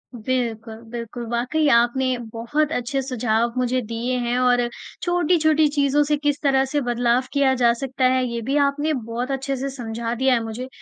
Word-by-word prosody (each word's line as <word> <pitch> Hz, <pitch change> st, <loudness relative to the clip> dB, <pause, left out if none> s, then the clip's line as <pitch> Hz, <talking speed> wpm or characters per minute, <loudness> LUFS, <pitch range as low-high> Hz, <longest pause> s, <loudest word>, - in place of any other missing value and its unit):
बिल्कुल, 230 Hz, -1 st, -3 dB, 0.2 s
बिल्कुल 235 Hz, 0 st, -6 dB
वाक़ई 250 Hz, +6 st, 0 dB
आपने 250 Hz, +2 st, +3 dB, 0.2 s
बहुत 295 Hz, +7 st, -1 dB
अच्छे 260 Hz, 0 st, -1 dB
सुझाव 240 Hz, -3 st, 0 dB
मुझे 255 Hz, 0 st, +1 dB
दिए 230 Hz, +2 st, -3 dB
हैं 240 Hz, +1 st, -1 dB
और 250 Hz, -1 st, +3 dB, 0.4 s
छोटी-छोटी 315 Hz, -3 st, +3 dB
चीज़ों 285 Hz, 0 st, +3 dB
से 295 Hz, +1 st, +1 dB
किस 290 Hz, 0 st, -1 dB
तरह 270 Hz, -2 st, +3 dB
से 290 Hz, +2 st, -1 dB
बदलाव 245 Hz, 0 st, +1 dB
किया 280 Hz, -2 st, +3 dB
जा 240 Hz, -2 st, +4 dB
सकता 265 Hz, -1 st, -1 dB
है 255 Hz, 0 st, +2 dB
ये 235 Hz, -1 st, -3 dB
भी 265 Hz, +5 st, -2 dB
आपने 295 Hz, +3 st, -1 dB
बहुत 240 Hz, 0 st, -4 dB
अच्छे 270 Hz, +1 st, -2 dB
से 275 Hz, +2 st, -3 dB
समझा 235 Hz, -3 st, -4 dB
दिया 260 Hz, +2 st, +2 dB
है 235 Hz, -2 st, +1 dB
मुझे 225 Hz, +3 st, -5 dB
255 Hz, 180 wpm, -22 LUFS, 235-275 Hz, 0.4 s, जा